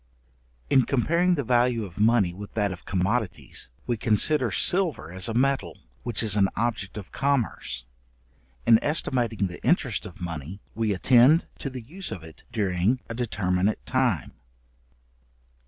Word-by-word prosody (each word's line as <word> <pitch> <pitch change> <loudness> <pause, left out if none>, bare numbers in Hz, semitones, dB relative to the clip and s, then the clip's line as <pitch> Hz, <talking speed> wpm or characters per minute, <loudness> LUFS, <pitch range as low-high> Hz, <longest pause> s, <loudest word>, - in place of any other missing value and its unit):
In 130 - +6
comparing 170 +7 +2
the 145 - -1
value 120 -2 +2
of 95 0 -11
money 105 -5 +3
with 100 +2 -10
that 105 -2 +1
of 90 - -9
commodities, 100 +3 -2 0.2
we 120 -2 -1
consider 120 +5 +2
silver 165 - +1
as 95 +5 -1
a 115 - -3
metal, 130 - +1 0.2
which 120 -2 -1
is 105 -3 +3
an 100 -2 +3
object 110 -3 -2
of 100 -3 -8
commerce. 135 - -1 0.8
In 115 -1 +5
estimating 120 -8 0
the 90 -2 -7
interest 125 - +1
of 95 -1 -13
money, 85 +1 -6
we 110 -1 0
attend 125 - +5
to 140 - -3
the 130 -1 -7
use 175 +8 -6
of 95 -7 -6
it 80 -1 -13
during 100 +3 +1
a - - -3
determinate 100 -4 -1
time. 125 - 0
110 Hz, 150 wpm, -26 LUFS, 95-130 Hz, 0.8 s, In